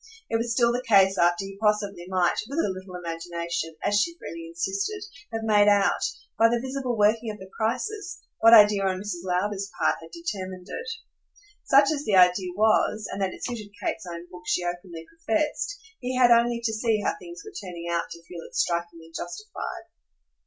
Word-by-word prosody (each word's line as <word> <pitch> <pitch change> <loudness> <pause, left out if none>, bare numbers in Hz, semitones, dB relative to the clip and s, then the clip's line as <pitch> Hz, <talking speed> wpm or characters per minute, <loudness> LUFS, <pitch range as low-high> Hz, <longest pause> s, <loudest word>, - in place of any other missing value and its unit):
It 225 - +3
was 230 +1 -2
still 235 0 +3
the 245 +1 -1
case 195 -5 +5
after 175 +2 +3
he 195 0 -9
possibly 205 -4 0
might, 185 -2 +1
with 280 - -5
a 330 - +2
little 185 0 -9
imagination, 170 -1 -4
as 205 0 +3
she 340 +9 -2
freely 335 -1 -8
insisted, 395 +4 -2 0.3
have 225 -1 -3
made 210 -2 +4
out, 200 -1 +4 0.4
by 230 0 +6
the 240 0 +1
visible 260 -1 -3
working 220 +2 +3
of 210 - -5
the 190 -1 -12
crisis, 350 - -2 0.2
what 225 +1 +7
idea 210 -3 +8
on 190 -1 0
Mrs. 190 -3 -4
Lowder's 190 +2 -1
part - - +2
had - - -11
determined 190 - -6
it. 475 +1 -5 0.8
Such 275 0 +5
as 290 -2 -2
the 215 -6 +1
idea 180 0 +5
was 215 0 +2
and 195 - -4
that 190 -1 +1
it - - -10
suited 215 -4 -6
Kate's 180 -3 -3
own 170 0 -7
book 180 - -10
she 180 - +1
openly 175 -2 -5
professed 305 - 0 0.2
he 255 +1 -3
had 245 -1 +6
only 235 0 +4
to 225 -1 0
see 220 -1 +1
how - - +1
things 175 0 -10
were - - -9
turning 175 -3 -7
out 170 0 -1
to 170 - -10
feel 170 0 -9
it - - -12
strikingly 170 -1 -2
justified. 420 - -6
205 Hz, 195 wpm, -26 LUFS, 180-240 Hz, 0.8 s, idea